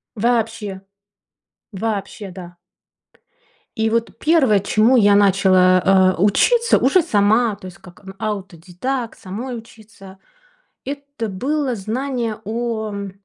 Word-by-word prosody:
Вообще, 220 -3 -1 0.9
вообще. 205 -1 -4
Да. 175 -1 -11 1.2
И 220 -1 0
вот 230 +1 -2
первое, 280 -11 +3
чему 220 +5 +3
я 205 -3 +5
начала, 185 -1 +4
э, - - -4
учиться 470 - +3
уже 310 +8 +3
сама, 215 -4 +2
то 185 - -14
есть 180 - -12
как, 180 +2 -17
м, 190 0 -10
аутодедакт, 200 +5 -5
самой 235 +7 -6
учиться. 215 -4 -14 0.7
Это 280 -4 -6
было 260 +6 -2
знание 230 +1 -3
о 225 0 -3
м 200 -1 -6
215 Hz, 115 wpm, -19 LUFS, 195-240 Hz, 1.2 s, я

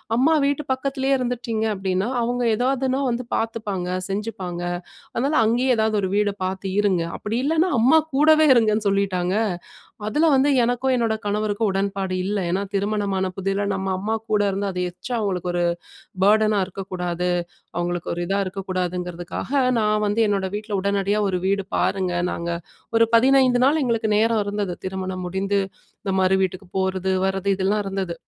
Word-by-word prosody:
அம்மா 275 +7 +4
வீட்டு 285 +1 0
பக்கத்திலேயே 270 +1 0
இருந்துட்டீங்க 240 -3 -2
அப்டீன்னா, 190 +1 -1
அவங்க 245 +1 -1
எதாவதுனா 260 +2 0
வந்து 245 +1 -1
பாத்துப்பாங்க, 210 -5 -2 0.2
செஞ்சுப்பாங்க. 195 -4 -4 0.5
அதனால 275 +6 +1
அங்கேயே 245 +4 +2
ஏதாவது 220 0 +1
ஒரு 190 - -1
வீடு 205 -1 +2
பார்த்து 190 +1 -3
இருங்க. 190 -5 +2
அப்டி 220 +3 -3
இல்லனா 325 +4 +2
அம்மா 265 +8 +6 0.2
கூடவே 310 +2 +5
இருங்கன்னு" 215 -2 +2
சொல்லீட்டாங்க. 195 -2 +1 0.7
அதுல 305 +8 +3
வந்து 280 +2 +3
எனக்கும், 245 +2 +1
என்னோட 225 -2 +1
கணவருக்கும் 210 0 0
உடன்பாடு 195 -1 -1
இல்ல. 205 0 -1
ஏன்னா 195 +3 0
திருமணமான 200 -2 0
புதில 195 +1 -1
நம்ம 195 0 -3
அம்மா 220 +3 -1
கூட 210 -1 +3
இருந்து 200 +1 -2
அத 180 - -5
எக்‌ஷ்ட்ரா 245 +7 -6
அவங்களுக்கு 180 -3 -1
ஒரு 175 - +1 0.6
பர்டனா 215 0 +4
இருக்கக்கூடாது. 180 -2 -3 0.5
அவங்களுக்கு 175 0 -2
ஒரு 175 - -4
இதா 195 +2 0
இருக்கக்கூடாதுங்கிறதுக்காக, 180 0 -4 0.3
நான் 215 0 +1
வந்து 205 +3 0
என்னோட 195 -2 0
வீட்ல 210 -1 -3
உடனடியா 200 +1 +1
ஒரு 185 - 0
வீடு 195 +1 +1
பாருங்க. 185 -2 0 0.2
நாங்க 170 0 -3 0.5
ஒரு 230 0 +5
15 260 0 +4
நாள் 300 +1 +3
எங்களுக்கு 230 -3 0
நேரம் 225 0 +2
இருந்துது. 205 -2 -2
திருமணம் 185 -1 -4
முடிந்து, 190 +2 -3 0.5
இந்த 195 - -2
மறு 185 0 +3
வீட்டுக்கு 190 +1 -3
போறது, 190 0 0
வரது 190 +1 -1
இதெல்லாம் 195 +2 0
இருந்துது. 195 -3 -3
205 Hz, 150 wpm, -23 LUFS, 190-230 Hz, 0.7 s, அம்மா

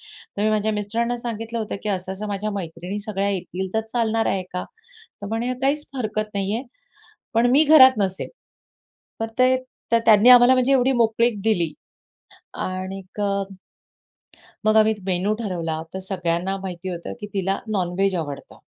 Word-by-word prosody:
तर 205 - -7
मी 215 - +3
माझ्या 215 0 +1
मिस्टरांना 230 +4 -1
सांगितलं 230 0 -4
होतं, 215 -2 -3
की 210 - -3
असं 185 0 -3
असं 210 +2 -5
माझ्या 205 +1 -2
मैत्रिणी 180 +1 -5
सगळ्या 200 -1 -2
येतील 190 0 -4
तर 220 - +3
चालणार 225 -2 +1
आहे 190 -1 0
का? 180 - -3 0.6
तर - - -4
म्हणे 235 +3 -1
काहीच 295 +2 +1
हरकत 215 -3 -3
नाही 200 +1 -1
आहे. 255 - -5 0.7
पण 240 +2 +4
मी 295 +4 +5
घरात 260 -6 +8
नसेल. 190 -2 -1 0.9
तर 225 - 0
ते 255 -2 +1
त्यांनी 215 +2 +6
आम्हाला 250 +1 +8
म्हणजे 255 +2 +2
एवढी 265 0 +4
मोकळीक 230 -2 +2
दिली. 175 -8 +1 0.9
आणि 185 +1 -4
क 210 - -4 1.4
मग 215 0 +3
आम्ही 220 0 +5
मेनू 190 +3 0
ठरवला. 165 -6 -3
तर - - -3
सगळ्यांना 185 0 -2
माहिती 185 -1 -6
होतं 170 -1 -6
की 210 - -5
तिला 195 0 0
नॉनव्हेज 190 -1 0
आवडतं. 145 -4 -6
210 Hz, 155 wpm, -23 LUFS, 190-230 Hz, 1.4 s, घरात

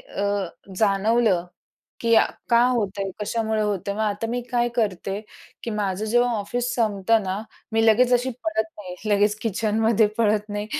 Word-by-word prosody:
अ, 200 - -5 0.5
जाणवलं 205 -1 +2 0.6
की 230 -1 +3 0.4
का 235 0 +6
होतंय? 205 -5 -1
कशामुळे 220 0 -1
होतंय? 200 -1 -2
मग 215 - -4
आता 210 +1 -1
मी 245 +1 -1
काय 240 0 +2
करते 200 -3 -1 0.4
की 235 - -4
माझं 205 -1 -2
जेव्हा 240 +3 +2
ऑफिस 245 +4 -2
संपतं 220 -1 +2
ना, 190 +2 -3 0.3
मी 225 0 +3
लगेच 245 +3 +4
अशी 245 +1 +2
पळत 220 0 0
नाही 185 -3 -7 0.2
लगेच 205 +1 +3
किचनमध्ये 220 0 +2
पळत 215 -1 +2
नाही. 205 0 -4
215 Hz, 150 wpm, -23 LUFS, 200-230 Hz, 0.6 s, का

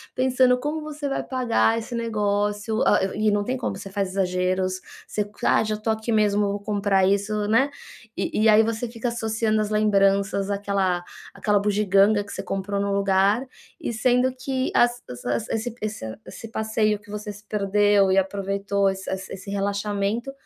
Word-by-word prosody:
pensando 255 -1 +3
como 300 +3 -3
você 300 -1 -5
vai - - -1
pagar 240 -3 +1
esse 230 +2 -5
negócio, 210 0 -1
ah 205 - +5 0.2
e 215 +1 0
e - - +5
não 205 0 +1
tem 255 +5 -2
como, - - -3
você 195 - -9
faz 195 -1 -1
exageros. 185 0 0 0.3
Você: 210 - -2 0.2
"Ah, - - +4
já 215 0 -1
estou 215 +1 -1
aqui 220 +1 -4
mesmo, 210 -1 +3
vou 200 - -3
comprar 200 -2 +1
isso.", 205 +1 0
né. 265 +6 +3 0.5
E - - -1
e - - +7
aí 215 +1 +7
você 225 +2 -2
fica 235 +1 -3
associando 220 -1 0
as 210 - -2
lembranças 200 -1 +2
àquela 200 -3 0 0.3
àquela 205 -1 +1
bugiganga 205 0 +3
que - - -10
você - - -4
comprou 195 +1 -3
no 200 0 -1
lugar 200 +4 +2 0.3
e - - -3
sendo 250 +3 +2
que 260 0 -2
as 240 0 +3 0.3
as 120 -1 -1
esse 225 +1 -3
esse 210 - -5
esse 225 - -9
passeio 220 -1 +1
em - - -9
que 205 0 -15
você 210 0 -5
se 205 - -14
perdeu 205 -1 +3
e 190 - +3
aproveitou, 195 +1 0
esse 190 0 -5
esse 190 0 -5
esse 190 +1 -8
relaxamento, 200 +4 -1
210 Hz, 180 wpm, -24 LUFS, 200-225 Hz, 0.5 s, e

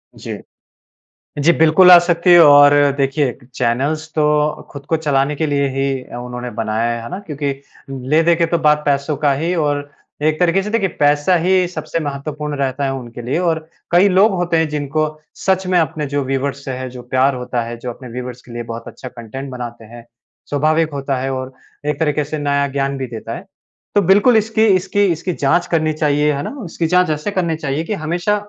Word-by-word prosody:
जी। - - -7 1.0
जी, 150 +4 +4
बिल्कुल 160 +3 +6
आ 175 - +11
सकती 175 +1 +2
है 175 - +9
और 145 0 +7 0.2
देखिए, 135 -1 +1 0.2
चैनल्स 140 +7 -1
तो 150 -1 +1
खुद 140 -1 -10
को 160 - +2
चलाने 145 -2 0
के 160 - -1
लिए 140 -1 +1
ही 135 +1 -1 0.2
उन्होंने 125 0 -6
बनाया 110 +1 0
है। 120 0 -4
है 115 - -7
ना? 185 - -5
क्योंकि 145 -2 -2 0.4
ले-देके 160 +6 +2
तो 170 +1 0
बात 150 0 +4
पैसों 140 +1 0
का 145 0 +2
ही 165 +6 -1
और 145 -3 -1 0.3
एक 155 0 +1
तरीक़े 180 +2 +3
से 210 - -4
देखिए 215 -3 +1
पैसा 145 +4 +3
ही 180 +2 +2
सबसे 170 -1 -4
महत्त्वपूर्ण 150 0 -4
रहता 135 0 -2
है 135 - -1
उनके 120 -2 -7
लिए 120 +5 -2
और 170 -3 +1 0.3
कई 180 +4 +5
लोग 195 +4 +4
होते 175 -2 0
हैं 160 0 +2
जिनको 150 +1 -1 0.3
सच 190 0 0
में 185 -1 +2
अपने 155 -1 -1
जो 145 0 -1
व्यूअर्स 135 +1 -3
से 135 - -3
है, 130 0 -5
जो 125 0 -9
प्यार 130 +2 +1
होता 125 -1 -3
है, 115 +1 -6
जो 125 +1 -6
अपने 125 +1 -12
व्यूअर्स 125 +1 -7
के 120 - -15
लिए 120 0 -4
बहुत 115 0 -8
अच्छा 130 - -9
कंटेंट 125 +3 -8
बनाते 120 -2 -7
हैं। 115 +1 -13 0.4
स्वाभाविक 155 +2 +1
होता 135 -1 -2
है 135 +1 -2
और 130 0 -5 0.3
एक 150 -1 -1
तरीक़े 150 -2 +1
से 150 +2 -5
नया 140 -1 0
ज्ञान 140 0 -1
भी 130 -1 -4
देता 115 -2 -7
है। - - -9 0.5
तो 205 - +5
बिल्कुल 205 +6 +5
इसकी 220 +1 +2
इसकी 195 +2 +1
इसकी 170 +2 -2
जाँच 170 +4 +1
करनी 155 -2 +1
चाहिए। 150 -1 +1
है 140 0 -3
ना? - - -6
इसकी 165 -1 -2
जाँच 180 +1 +3
ऐसे 155 +6 -2
करनी 175 -4 -1
चाहिए 150 0 -3
कि 190 - -3
हमेशा 175 +6 0
145 Hz, 205 wpm, -18 LUFS, 135-165 Hz, 1.0 s, आ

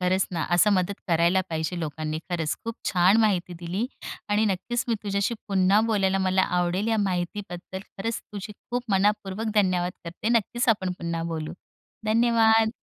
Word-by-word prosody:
खरंच 185 +1 +2
ना, 165 -2 -1
असं 175 +4 +5
मदत 190 +1 0
करायला 170 +2 +3
पाहिजे 160 +2 -2
लोकांनी, 155 0 -3
खरंच 165 -3 -1
खूप 230 0 -3
छान 185 +2 +4
माहिती 190 -5 +1
दिली. 180 +7 -2 0.4
आणि 210 +1 +2
नक्कीच 215 +5 -1
मी 230 - +2
तुझ्याशी 200 +2 0
पुन्हा 195 +1 +4
बोलायला 195 -3 +2
मला 190 0 +2 0.2
आवडेल. 180 +4 0
या 225 - +2
माहितीबद्दल 185 -1 -3
खरंच 215 +3 -5
तुझी 205 +1 -6
खूप 245 +4 -5
मनःपूर्वक 205 +2 +1
धन्यवाद 180 -3 +2
करते. 170 +6 -4
नक्कीच 240 +2 +1
आपण 190 -5 +2
पुन्हा 170 -1 -3
बोलू. 155 0 -4 0.5
धन्यवाद! 225 0 +4
190 Hz, 155 wpm, -26 LUFS, 175-215 Hz, 0.5 s, असं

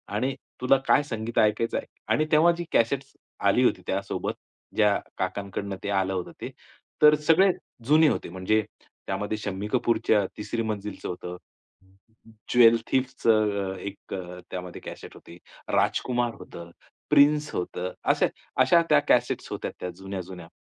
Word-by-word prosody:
आणि 130 +5 0 0.3
तुला 130 +2 +5
काय 145 - +5
संगीत 115 -3 -5
ऐकायचं 110 +2 +2
आहे - - -3
ऐक - - -11
आणि 155 - +3
तेव्हा 160 +3 +6
जी 175 - -3
कॅसेट्स 135 +4 +1 0.3
आली 125 +6 +4
होती 95 - +2
त्यासोबत, 100 +1 -2 0.4
ज्या 105 -2 +4 0.2
काकांकडून 100 0 -3
ते 100 - -3
आलं 95 -1 +1
होतं 90 -1 -4
ते. - - -4 0.5
तर 150 0 +8
सगळे 165 +6 +4 0.3
जुने 155 +3 +5
होते - - -1
म्हणजे 95 +4 +1 0.5
त्यामध्ये 105 +2 -2
शम्मी 100 -1 -4
कपूरच्या 110 -4 +2
तिसरी 115 +2 -3
मंजिलचं 105 -2 -4
होतं. 90 0 -6 1.2
ज्वेलथीफचं 115 -4 +3
अ, - - -9
एक 100 0 -8
अ, 90 -1 -6
त्यामध्ये 90 -1 -6
कॅसेट - - -9
होती. 85 - -14 0.4
राजकुमार 120 -2 +1
होतं, 85 0 -10 0.4
प्रिन्स 150 0 +4
होतं 90 0 -3 0.2
असं - - +2 0.3
अशा 170 +6 +5
त्या - - +6
कॅसेट्स - - +2
होत्या - - -4
त्या 90 - -4
जुन्या-जुन्या. 95 -3 -7
110 Hz, 145 wpm, -26 LUFS, 95-130 Hz, 1.2 s, तर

